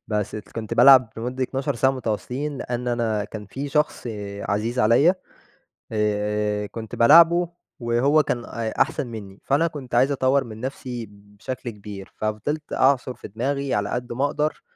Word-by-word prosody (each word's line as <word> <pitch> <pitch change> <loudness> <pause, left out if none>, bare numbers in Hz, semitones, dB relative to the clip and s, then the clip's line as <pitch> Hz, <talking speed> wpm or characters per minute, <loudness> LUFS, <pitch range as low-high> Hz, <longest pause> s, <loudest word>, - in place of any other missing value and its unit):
بس 105 -2 -1
الت 110 - -8
كنت 110 -2 -4
بالعب 130 -4 +7
لمدة 125 +3 -3
12 135 +2 -2
ساعة 130 +3 +3
متواصلين 130 +3 -3
لأن 125 -1 -3
أنا 115 -3 0
كان 105 0 -8
في 135 +8 -5
شخص 150 -2 0 0.4
عزيز 110 +5 -1
عليَّ 125 - +5 0.8
آآ 105 -1 0
كنت 110 +1 -7
بالاعبه، 170 +6 +6 0.3
وهو 125 +6 +3
كان 120 -3 -2
أ 115 -1 -4
أحسن 135 - 0
منّي، 105 -4 -9
فأنا 145 +5 +2
كنت 135 -6 -6
عايز 130 +4 +4
أطوّر 135 0 +2
من 110 -3 -9
نفْسي 125 -2 -5
بشكل 105 +5 -8
كبير، 100 -2 -9
ففضلت 110 +9 -3
أعصُر 130 -1 +2
في - - -10
دماغي 135 +6 -2
على 100 0 0
قد 120 -1 -3
ما 135 +4 +1
أقدر 150 +1 -1
120 Hz, 160 wpm, -23 LUFS, 110-140 Hz, 0.8 s, بالعب